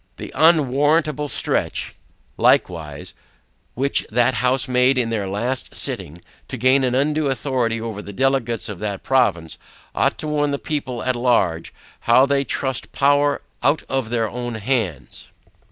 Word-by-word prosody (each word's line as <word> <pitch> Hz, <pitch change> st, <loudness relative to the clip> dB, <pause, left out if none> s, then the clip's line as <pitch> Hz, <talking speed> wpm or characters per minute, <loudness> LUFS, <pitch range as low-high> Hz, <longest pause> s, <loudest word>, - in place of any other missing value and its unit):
The -, -, -8 dB
unwarrantable 150 Hz, -1 st, +3 dB
stretch -, -, -1 dB, 0.4 s
likewise, 75 Hz, -4 st, 0 dB, 0.6 s
which 140 Hz, +3 st, +1 dB
that 120 Hz, +3 st, +3 dB
house 125 Hz, 0 st, +1 dB
made 125 Hz, +1 st, +3 dB
in 115 Hz, -2 st, 0 dB
their 105 Hz, -4 st, -2 dB
last 120 Hz, +7 st, -3 dB
sitting, 85 Hz, +4 st, -5 dB, 0.3 s
to 130 Hz, -, -6 dB
gain 130 Hz, +3 st, +3 dB
an 125 Hz, -1 st, +1 dB
undue 150 Hz, +2 st, +1 dB
authority 125 Hz, -3 st, -1 dB
over 110 Hz, -2 st, -5 dB
the 100 Hz, -, -9 dB
Delegates 120 Hz, -1 st, 0 dB
of 105 Hz, -4 st, -7 dB
that 100 Hz, -2 st, -4 dB
province, 85 Hz, -12 st, +1 dB, 0.3 s
ought -, -, +1 dB
to 155 Hz, -, -5 dB
warn 145 Hz, -1 st, 0 dB
the 140 Hz, -, -1 dB
people 130 Hz, -5 st, -4 dB
at 130 Hz, -1 st, 0 dB
large, 115 Hz, -9 st, +1 dB, 0.4 s
how 130 Hz, +3 st, +7 dB
they 140 Hz, 0 st, +1 dB
trust 130 Hz, -1 st, -3 dB
power 145 Hz, +1 st, +2 dB, 0.2 s
out 155 Hz, -, +2 dB
of 135 Hz, -4 st, -1 dB
their 115 Hz, -2 st, 0 dB
own 120 Hz, +1 st, -5 dB
hands. 110 Hz, -, -3 dB
125 Hz, 150 wpm, -21 LUFS, 115-140 Hz, 0.6 s, how